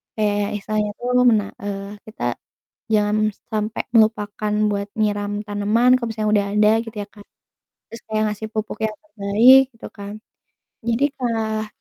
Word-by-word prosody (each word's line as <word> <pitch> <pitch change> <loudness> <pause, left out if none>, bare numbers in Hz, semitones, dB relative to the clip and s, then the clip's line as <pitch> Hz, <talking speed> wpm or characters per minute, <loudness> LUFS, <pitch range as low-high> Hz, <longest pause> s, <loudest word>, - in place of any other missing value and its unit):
kayak 205 -1 0
istilahnya 210 0 -2
tuh 245 - -4 0.2
mena 210 -3 +3 0.2
eee, 200 0 -5
kita 220 - -3 0.6
jangan 215 0 +2 0.2
sampai 215 +1 -2
melupakan 215 -1 +2 0.2
buat 200 0 -2
nyiram 205 -1 -1
tanaman 210 +5 +3
kalau 235 - -3
misalnya 215 -1 -1
udah 200 -1 +2
ada 210 0 +5
gitu 225 -1 -10
ya - - -12
kan, 205 -1 -15 0.7
terus 230 - -10
kayak 215 0 0
ngasih 210 +1 -5
pupuk 215 0 -3
yang 215 - -2
terbaik 240 -1 +5
gitu 230 - -10
kan. 200 0 -8 0.7
Jadi 235 +5 +2
kah 220 -3 -1
215 Hz, 145 wpm, -21 LUFS, 205-225 Hz, 0.7 s, ada